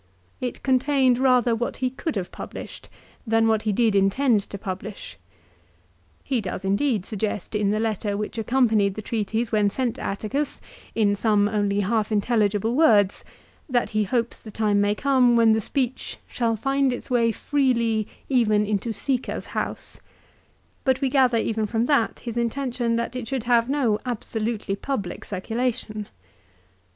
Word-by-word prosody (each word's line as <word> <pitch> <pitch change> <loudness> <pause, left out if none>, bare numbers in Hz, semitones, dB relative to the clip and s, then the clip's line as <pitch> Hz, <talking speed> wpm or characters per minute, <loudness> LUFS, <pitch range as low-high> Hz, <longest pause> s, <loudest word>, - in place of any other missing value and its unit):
It 250 -1 -5
contained 260 -1 +3
rather 250 -3 +4
what 235 +1 -3
he 255 -1 -1
could 305 +4 -4
have 185 -3 -3
published, - - -8 0.4
than 225 0 +3
what 220 -1 +2
he 215 - 0
did 220 0 +2
intend 205 +4 +3
to 200 - -6
publish. 190 - -7 1.0
He 260 -4 -1
does 190 0 -5
indeed 200 0 +1
suggest, 210 -2 -3
in 210 -2 +1
the 210 +1 +1
letter 215 -2 -1
which 210 +2 -4
accompanied 220 -5 +2
the 215 - -6
treatise 220 +1 -2
when 210 -2 +3
sent 245 +2 -2
to - - -8
Atticus, 220 +9 -3 0.4
in 205 -2 +3
some 205 -1 +2
only 205 -1 0
half 215 +2 0
intelligible 210 0 +1
words, 215 -10 +4 0.5
that 245 -2 +1
he 215 -1 +1
hopes 235 +3 -1
the 220 - -11
time 210 -1 +1
may 205 0 +2
come 255 -2 +3
when 230 -1 +5
the 220 0 +2
speech 260 +2 -2
"shall 230 -2 0
find 270 +4 +1
its 245 - -6
way 230 -2 +3
freely 235 -4 +1 0.2
even 215 -5 +3
into 210 +2 -1
Sica's 245 +4 -2
house; - - -4 0.3
" - - -35
* - - -39
but 260 -1 +2
we 270 -1 +1
gather 255 -3 +3
even 220 -1 0
from 225 +2 0
that 275 -5 +1
his 235 -1 -5
intention 240 0 -1
that 235 +1 -2
it 250 -3 -4
should 265 -2 -2
have 235 0 +3
no 250 -7 +1
absolutely 225 -3 -3
public 205 -4 -4
circulation. 215 +1 -3
225 Hz, 165 wpm, -24 LUFS, 210-250 Hz, 1.0 s, when